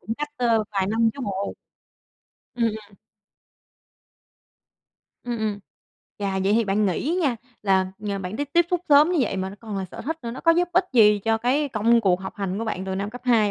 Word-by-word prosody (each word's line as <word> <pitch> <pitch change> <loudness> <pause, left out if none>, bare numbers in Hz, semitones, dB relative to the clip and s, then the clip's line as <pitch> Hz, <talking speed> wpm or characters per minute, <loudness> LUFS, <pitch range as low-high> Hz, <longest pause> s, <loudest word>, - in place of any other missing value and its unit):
Cũng 225 - -4
cách, 295 0 -2
ơ, 230 -4 +2
vài 195 -2 0
năm 225 +2 +2
chứ 280 - -8
bộ. 200 0 -3 1.0
Ừm, 235 -1 0
ừm. 215 -2 -4 2.3
Ừm, 240 -1 -3
ừm. 210 -2 -2 0.6
Chà, 195 -1 -1
vậy 200 - +3
thì 230 +1 +3
bạn 205 +1 +1
nghĩ 265 - -1
nha, 265 -6 +1 0.3
là, 190 -2 +2 0.2
à, 200 -1 -2
bạn 185 +2 -5
tiếp 290 +1 -3
tiếp 345 0 +4
xúc 360 - +1
sớm 295 +4 +6
như 350 - +1
vậy 215 -5 0
mà 190 0 -2
nó 200 - -11
còn 215 -3 -6
là 190 - -2
sở 185 - -10
thích 320 +5 -3
nữa, 235 - -4
nó 245 - -7
có 330 - +4
giúp 350 +1 +1
ích 365 +1 +4
gì 210 -3 +6
cho 225 +2 0
cái 275 +5 +1
công 230 0 +3
cuộc 185 -4 +2
học 190 - -7
hành 195 -1 -3
của 225 - -2
bạn 190 -4 -3
từ 190 - -3
năm 200 +2 -3
cấp 245 +1 -9
2 225 -4 +3
220 Hz, 220 wpm, -24 LUFS, 195-245 Hz, 2.3 s, sớm